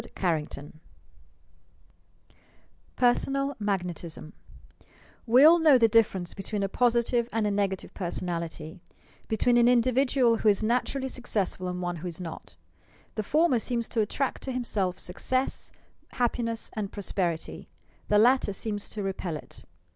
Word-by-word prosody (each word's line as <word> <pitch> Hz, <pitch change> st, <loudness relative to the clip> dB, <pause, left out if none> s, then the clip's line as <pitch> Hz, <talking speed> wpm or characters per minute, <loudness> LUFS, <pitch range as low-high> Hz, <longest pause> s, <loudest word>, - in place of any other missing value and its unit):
CHAPTER 160 Hz, -6 st, -1 dB
XXXI 145 Hz, -, -13 dB, 2.2 s
PERSONAL 275 Hz, +3 st, +1 dB
MAGNETISM 180 Hz, -6 st, -4 dB, 0.9 s
We 245 Hz, +4 st, +6 dB
all 335 Hz, +3 st, +8 dB
know 305 Hz, -5 st, +6 dB
the 230 Hz, -2 st, +5 dB
difference 205 Hz, -5 st, +2 dB
between 200 Hz, +1 st, -3 dB
a -, -, +1 dB
positive 235 Hz, +2 st, +1 dB
and 225 Hz, -1 st, 0 dB
nega 200 Hz, -2 st, 0 dB
tive -, -, -13 dB
personality; 170 Hz, -3 st, -5 dB, 0.5 s
between 240 Hz, +2 st, +2 dB
an 240 Hz, 0 st, +5 dB
individual 250 Hz, 0 st, +3 dB
who 220 Hz, -, +3 dB
is 205 Hz, +1 st, +2 dB
natur 245 Hz, +4 st, 0 dB
ally 265 Hz, -1 st, -2 dB
successful 210 Hz, -8 st, -2 dB
and 180 Hz, 0 st, -4 dB
one 175 Hz, -1 st, -2 dB
who 170 Hz, +3 st, -6 dB
is 170 Hz, -1 st, -6 dB
not. 170 Hz, -3 st, -8 dB, 0.6 s
The 215 Hz, -, -2 dB
former 295 Hz, +3 st, +2 dB
seems 235 Hz, 0 st, -2 dB
to 230 Hz, -, 0 dB
attract 255 Hz, +5 st, -2 dB
to 265 Hz, -, -4 dB
himself 210 Hz, -7 st, -1 dB
success, 255 Hz, +8 st, -2 dB, 0.4 s
happiness 235 Hz, -2 st, -1 dB
and 210 Hz, -3 st, -4 dB
prosperity; 175 Hz, -4 st, -3 dB, 0.4 s
the 210 Hz, -, +3 dB
latter 240 Hz, -1 st, +4 dB
seems 205 Hz, 0 st, -4 dB
to 210 Hz, -, -5 dB
repel 185 Hz, -4 st, -3 dB
it. -, -, -13 dB
215 Hz, 140 wpm, -27 LUFS, 185-245 Hz, 2.2 s, all